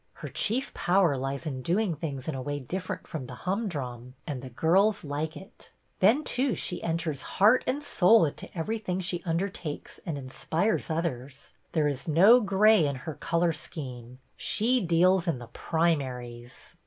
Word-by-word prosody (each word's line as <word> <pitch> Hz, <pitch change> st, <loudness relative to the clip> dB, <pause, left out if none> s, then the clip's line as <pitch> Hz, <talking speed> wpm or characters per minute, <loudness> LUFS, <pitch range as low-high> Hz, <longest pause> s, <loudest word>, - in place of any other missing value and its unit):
Her -, -, -8 dB
chief 255 Hz, +6 st, -1 dB
power 175 Hz, -5 st, +2 dB
lies 135 Hz, +3 st, -4 dB
in 135 Hz, -4 st, -4 dB
doing 185 Hz, -, +1 dB
things 140 Hz, -4 st, -5 dB
in 160 Hz, -, -1 dB
a 135 Hz, -, -4 dB
way 145 Hz, +2 st, -3 dB
different 180 Hz, +8 st, -5 dB
from 140 Hz, -6 st, -6 dB
the 125 Hz, -, -8 dB
humdrum, 140 Hz, -, -3 dB
and 130 Hz, -4 st, -6 dB
girls 195 Hz, -, +3 dB
like 155 Hz, +2 st, -3 dB
it. 190 Hz, +4 st, -13 dB, 0.3 s
Then, 285 Hz, +7 st, +4 dB
too, 255 Hz, -2 st, +1 dB
she 180 Hz, -, -2 dB
enters 165 Hz, -4 st, -2 dB, 0.2 s
heart 215 Hz, +6 st, +5 dB
and 285 Hz, +3 st, -1 dB
soul 215 Hz, -, +5 dB
into 145 Hz, -, -5 dB
everything 190 Hz, +1 st, -2 dB
she 175 Hz, -1 st, -2 dB
undertakes 165 Hz, -2 st, -3 dB
and 160 Hz, -4 st, -4 dB
inspires 160 Hz, +11 st, -1 dB
others. 140 Hz, -5 st, -4 dB, 0.2 s
There 155 Hz, -2 st, +2 dB
is 145 Hz, +3 st, -3 dB
no 195 Hz, +11 st, +7 dB
gray 205 Hz, -3 st, +4 dB
in 140 Hz, -, -2 dB
her 160 Hz, -, -4 dB
color 170 Hz, +2 st, 0 dB
scheme; 125 Hz, -6 st, -7 dB, 0.2 s
she 245 Hz, +4 st, +1 dB
deals 180 Hz, +2 st, +3 dB
in 165 Hz, -, +1 dB
the 120 Hz, -1 st, -10 dB
primaries." 125 Hz, -7 st, -2 dB
165 Hz, 160 wpm, -28 LUFS, 140-195 Hz, 0.3 s, no